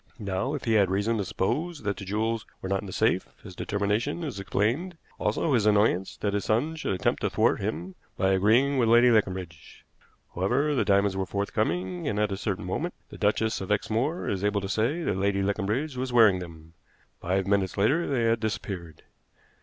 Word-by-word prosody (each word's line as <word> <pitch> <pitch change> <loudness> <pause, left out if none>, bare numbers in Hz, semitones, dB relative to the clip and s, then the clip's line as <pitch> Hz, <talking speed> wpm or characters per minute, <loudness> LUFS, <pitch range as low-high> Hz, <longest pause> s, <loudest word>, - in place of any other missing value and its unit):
Now, 100 +6 -2
if 145 - -6
he 115 - +1
had 100 -4 +4
reason 100 +4 0
to - - 0
suppose 145 - -2
that 100 -1 -1
the 100 - -7
jewels 110 +3 -1 0.2
were - - -6
not 95 0 0
in 100 - -9
the - - -7
safe, 110 -1 +1
his 95 -4 -10
determination 105 - -1
is 140 -10 -4
explained, 125 - -1 0.2
also 110 +8 0
his 110 -4 +3
annoyance 105 -3 +2
that 100 -1 0
his 105 - -1
son 135 +9 +1
should 155 - -2
attempt - - 0
to - - +1
thwart - - +2
him 85 +5 -3 0.2
by 95 0 +2
agreeing 115 +9 +3
with 115 -2 +3
Lady 120 +1 +6
Leconbridge. 95 -7 -2 0.5
However, 125 +12 +1
the 130 - +2
diamonds 100 -1 +2
were 95 -1 -2
forthcoming, 95 -3 -2
and 105 - -1
at 105 -1 +1
a - - -1
certain 100 -1 -3
moment 160 - -3
the - - -10
Duchess 110 0 +1
of 95 - -4
Exmoor 115 - 0
is 100 -1 -2
able 105 -1 +1
to 95 - -4
say 115 - 0
that 100 - -1
Lady 100 0 +1
Leconbridge 110 +9 -1
was 130 0 -3
wearing 110 -6 +5
them. 80 -2 -10 0.5
Five 95 +2 0
minutes 100 -1 0
later 145 +12 +2
they 130 -4 0
had 115 0 +2
disappeared. 95 -7 -5
105 Hz, 200 wpm, -27 LUFS, 95-120 Hz, 0.5 s, Lady